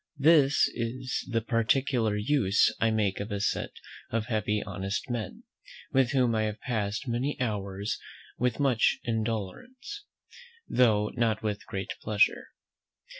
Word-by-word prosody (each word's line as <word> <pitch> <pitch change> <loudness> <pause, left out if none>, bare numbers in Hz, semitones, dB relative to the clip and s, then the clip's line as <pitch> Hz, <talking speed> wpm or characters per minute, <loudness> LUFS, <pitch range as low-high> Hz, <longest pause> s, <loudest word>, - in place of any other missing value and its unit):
This 145 -1 +5
is 125 +2 -3
the 115 -2 +1
particular 115 -1 +1
use 105 -3 +2
I 115 - +3
make 105 -3 0
of 100 +2 -5
a 100 - -1
set 100 - 0 0.4
of 115 -1 -1
heavy 105 -2 0
honest 100 +3 -4
men, 115 -3 -4 0.5
with 130 -2 +3
whom 130 -4 +2
I 110 - +1
have 105 0 -4
passed 105 -3 -2
many 125 +5 -1
hours 100 -4 -2 0.4
with 125 +2 0
much 130 -5 +3
indolence, 120 - -4 0.6
though 105 -4 +3
not 115 -3 0
with 105 -1 -3
great 95 0 -4
pleasure. 105 -1 +2
115 Hz, 130 wpm, -28 LUFS, 105-130 Hz, 0.6 s, This